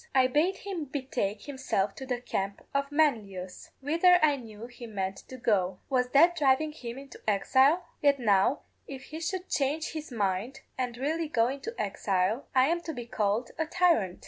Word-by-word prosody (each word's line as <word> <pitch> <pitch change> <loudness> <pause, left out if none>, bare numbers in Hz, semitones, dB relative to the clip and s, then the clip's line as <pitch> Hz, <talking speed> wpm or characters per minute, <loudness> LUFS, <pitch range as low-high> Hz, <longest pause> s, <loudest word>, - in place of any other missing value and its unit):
I 260 -1 +6
bade 310 +9 +2
him 375 -6 -5
betake 260 -7 -3
himself 260 -8 -1
to 265 - -7
the 250 -2 -1
camp 200 -5 -4
of 280 0 -1
Manlius, 210 -12 -1
whither 335 +6 +5
I 295 -2 +5
knew 225 -4 -9
he 240 0 -10
meant 195 -3 -3
to 260 - -9
go. 190 -6 +1
Was 250 -1 +2
that 335 +6 +5
driving 300 0 +2
him 245 -5 -7
into 275 0 -11
exile? 265 - +3 0.2
Yet 285 -1 +4
now 210 +3 +3 0.3
if 270 -1 -8
he 310 +3 -8
should 360 +3 -3
change 295 +3 -1
his 310 -2 -7
mind, 215 +4 -2
and 245 -2 -3
really 315 +5 -1
go 235 -5 +2
into 280 - -6
exile, 200 +3 0
I 260 0 +6
am 340 +1 0
to 325 -1 -5
be 240 -3 -6
called 220 0 -1
a 320 - 0
tyrant. 335 - +2
260 Hz, 180 wpm, -29 LUFS, 215-305 Hz, 0.3 s, I